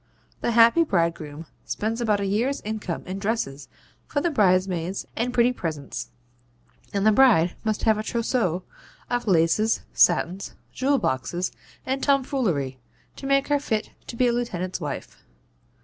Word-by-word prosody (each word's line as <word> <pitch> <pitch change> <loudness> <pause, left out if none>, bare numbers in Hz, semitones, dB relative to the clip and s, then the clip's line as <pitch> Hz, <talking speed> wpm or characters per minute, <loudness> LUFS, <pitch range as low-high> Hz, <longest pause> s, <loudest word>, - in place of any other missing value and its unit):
The 235 - -1
happy 235 +8 +6
bridegroom 165 - -1 0.2
spends 225 +3 -2
about 215 -3 +2
a 200 - -1
year's 235 +8 0
income 210 -5 -4
in 185 +1 -5
dresses 195 -10 -2 0.4
for 290 - -1
the 340 +3 0
bridesmaids 185 - +1
and 240 +2 -1
pretty 245 0 +3
presents; 155 - -5 0.8
and 200 0 0
the 215 - +7
bride 205 -8 +5
must 215 -1 -1
have 220 -1 +3
a - - 0
TROUSSEAU 220 -6 -1 0.5
of 245 -1 -1
laces, 190 +5 +3
satins, 180 +2 +2 0.2
jewel 275 +2 +2
boxes 175 - -1 0.3
and 265 +1 -1
tomfoolery, 240 - 0 0.4
to 270 - -7
make 275 0 +2
her 290 0 +3
fit 220 -6 -2 0.2
to - - -6
be 250 - +2
a 240 - +2
lieutenant's 185 -7 -3
wife. 145 -3 -6
215 Hz, 150 wpm, -25 LUFS, 175-245 Hz, 0.8 s, the